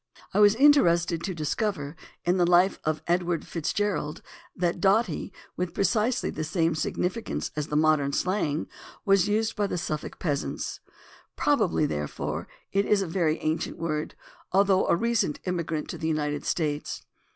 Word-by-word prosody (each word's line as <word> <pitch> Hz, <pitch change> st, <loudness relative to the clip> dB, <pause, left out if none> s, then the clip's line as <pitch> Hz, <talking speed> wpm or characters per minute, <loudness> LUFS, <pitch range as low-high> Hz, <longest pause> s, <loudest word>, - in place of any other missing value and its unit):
I -, -, +2 dB
was 205 Hz, 0 st, +6 dB
interested 175 Hz, -, +4 dB
to 185 Hz, +1 st, -3 dB
dis 155 Hz, -2 st, -1 dB
cover 165 Hz, -9 st, -2 dB, 0.3 s
in 175 Hz, +2 st, +2 dB
the 175 Hz, -1 st, +3 dB
Life 180 Hz, +2 st, +4 dB
of 155 Hz, 0 st, -1 dB
Edward 175 Hz, -1 st, 0 dB
Fitzgerald 170 Hz, -2 st, -2 dB, 0.3 s
that 175 Hz, -1 st, -1 dB
"dotty," 195 Hz, -2 st, +2 dB, 0.2 s
with 180 Hz, -1 st, -3 dB
precisely 220 Hz, +5 st, +1 dB
the 155 Hz, -, -4 dB
same 165 Hz, +1 st, +1 dB
significance 180 Hz, +7 st, -2 dB
as 150 Hz, -1 st, -2 dB
the 150 Hz, -, -3 dB
modern 155 Hz, -2 st, +3 dB
slang, 160 Hz, -2 st, 0 dB, 0.4 s
was 195 Hz, -1 st, +4 dB
used 220 Hz, +2 st, 0 dB
by 205 Hz, -1 st, 0 dB
the 180 Hz, -, -3 dB
Suffolk 155 Hz, -2 st, -4 dB
peasants. 145 Hz, -4 st, -3 dB, 0.6 s
Probably, 215 Hz, -, +2 dB
therefore, 75 Hz, -, -3 dB, 0.2 s
it 200 Hz, +1 st, +1 dB
is 200 Hz, -2 st, +3 dB
a -, -, -4 dB
very 165 Hz, -2 st, +1 dB
ancient 160 Hz, +1 st, -2 dB
word, 155 Hz, -2 st, -3 dB, 0.4 s
although 195 Hz, 0 st, +3 dB
a -, -, +4 dB
recent 225 Hz, -5 st, 0 dB
immigrant 170 Hz, -4 st, -2 dB
to -, -, -6 dB
the 160 Hz, -, -2 dB
United 150 Hz, -2 st, -1 dB
States. 150 Hz, -4 st, -2 dB
175 Hz, 155 wpm, -27 LUFS, 155-200 Hz, 0.6 s, was